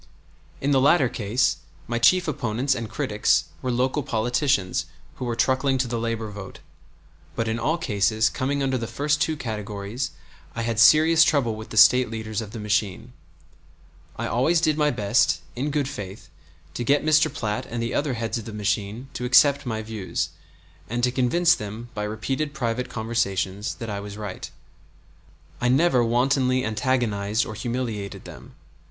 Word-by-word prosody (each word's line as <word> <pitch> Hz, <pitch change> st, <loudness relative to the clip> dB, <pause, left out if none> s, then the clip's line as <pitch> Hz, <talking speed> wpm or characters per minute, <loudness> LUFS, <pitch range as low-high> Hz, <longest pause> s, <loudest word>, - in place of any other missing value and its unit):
In 140 Hz, -, +1 dB
the 135 Hz, -2 st, +4 dB
latter 140 Hz, 0 st, +5 dB
case 120 Hz, 0 st, 0 dB, 0.3 s
my 120 Hz, 0 st, -2 dB
chief 180 Hz, +9 st, +4 dB
opponents 125 Hz, -1 st, 0 dB
and 115 Hz, -3 st, -4 dB
critics -, -, +1 dB, 0.2 s
were 130 Hz, -, -2 dB
local 130 Hz, +4 st, 0 dB
politicians 120 Hz, -, 0 dB, 0.3 s
who 130 Hz, -, -4 dB
were 120 Hz, -1 st, -2 dB
truckling 130 Hz, +3 st, +2 dB
to 130 Hz, -1 st, 0 dB
the 120 Hz, -1 st, -2 dB
labor 115 Hz, -2 st, -3 dB
vote; 100 Hz, -2 st, -9 dB, 0.8 s
but 115 Hz, -, -1 dB
in 110 Hz, +1 st, -1 dB
all 155 Hz, +8 st, 0 dB
cases 110 Hz, -, +1 dB
coming 140 Hz, +4 st, -1 dB
under 130 Hz, -1 st, 0 dB
the 115 Hz, -, -4 dB
first 150 Hz, +6 st, 0 dB
two 160 Hz, -1 st, +1 dB
categories 105 Hz, 0 st, -4 dB, 0.5 s
I 115 Hz, -, -2 dB
had 115 Hz, -1 st, -1 dB
serious 160 Hz, +6 st, +7 dB
trouble 135 Hz, -8 st, +1 dB
with 110 Hz, +1 st, -9 dB
the 110 Hz, -, -6 dB
State 125 Hz, +3 st, +7 dB
leaders 110 Hz, -1 st, -4 dB
of 110 Hz, -, -7 dB
the 115 Hz, +2 st, -8 dB
machine. 105 Hz, +2 st, -1 dB, 1.0 s
I -, -, -4 dB
always 155 Hz, +8 st, +2 dB
did 155 Hz, -2 st, +2 dB
my 150 Hz, -1 st, +2 dB
best, 110 Hz, -1 st, +2 dB
in 135 Hz, +5 st, -2 dB
good 145 Hz, -2 st, 0 dB
faith, 100 Hz, -7 st, -8 dB, 0.4 s
to 120 Hz, -, -3 dB
get 145 Hz, +4 st, +2 dB
Mr. 155 Hz, 0 st, +4 dB
Platt 120 Hz, +2 st, -3 dB
and 120 Hz, -, -4 dB
the 115 Hz, 0 st, -2 dB
other 140 Hz, -3 st, 0 dB
heads 115 Hz, +1 st, -2 dB
of 110 Hz, -, -9 dB
the 110 Hz, -, -7 dB
machine 105 Hz, +3 st, -2 dB
to -, -, -5 dB
accept 140 Hz, +2 st, +5 dB
my 110 Hz, -2 st, -3 dB
views, 110 Hz, -4 st, -3 dB, 0.6 s
and 120 Hz, +2 st, -2 dB
to 125 Hz, -, +3 dB
convince 135 Hz, +8 st, +3 dB
them, 110 Hz, +3 st, -6 dB
by 105 Hz, -1 st, -3 dB
repeated 135 Hz, +8 st, -3 dB
private 125 Hz, -2 st, -2 dB
conversations, 105 Hz, -3 st, -2 dB
that 115 Hz, -2 st, -6 dB
I 100 Hz, -, -3 dB
was 100 Hz, 0 st, -8 dB
right. 105 Hz, -3 st, -6 dB, 1.1 s
I 120 Hz, -, +2 dB
never 130 Hz, 0 st, +4 dB
wantonly 130 Hz, +2 st, +2 dB
antagonized 110 Hz, -2 st, 0 dB
or 110 Hz, -, -6 dB
humiliated 115 Hz, -3 st, -4 dB
them. -, -, -12 dB
120 Hz, 170 wpm, -24 LUFS, 110-135 Hz, 1.1 s, serious